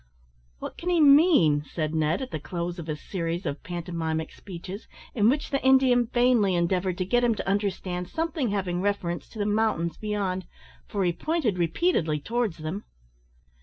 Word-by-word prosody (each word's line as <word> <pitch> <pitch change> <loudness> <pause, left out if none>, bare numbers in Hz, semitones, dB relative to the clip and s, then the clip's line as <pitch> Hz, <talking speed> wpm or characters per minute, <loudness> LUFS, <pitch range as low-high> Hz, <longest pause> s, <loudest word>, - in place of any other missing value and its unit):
"What - - -7
can 350 - -3
he 350 -2 +3
mean?" 280 - +6
said 155 +1 -3
Ned, 160 - +1
at 260 - -7
the 155 - -3
close 170 +4 -4
of 165 -1 -7
a 155 - -1
series 170 +2 -4
of 140 - -3
pantomimic 165 -3 -3
speeches, 190 +2 -9 0.3
in 215 -1 +4
which 290 +4 -1
the 275 - 0
Indian 260 -2 +5
vainly 240 -6 +3
endeavoured 180 +1 0
to 185 - -1
get 245 +5 +2
him 235 -2 +3
to - - -5
understand 190 -3 -1
something 320 -6 -1
having 185 -3 -1
reference 185 -4 -2
to - - -13
the 205 - -1
mountains 205 -6 0
beyond, 195 -4 -2 0.4
for 200 -2 -1
he 175 -1 +2
pointed 285 - -1
repeatedly 170 - +1
towards 230 +2 -1
them. 160 +6 -5
190 Hz, 170 wpm, -26 LUFS, 170-240 Hz, 0.4 s, mean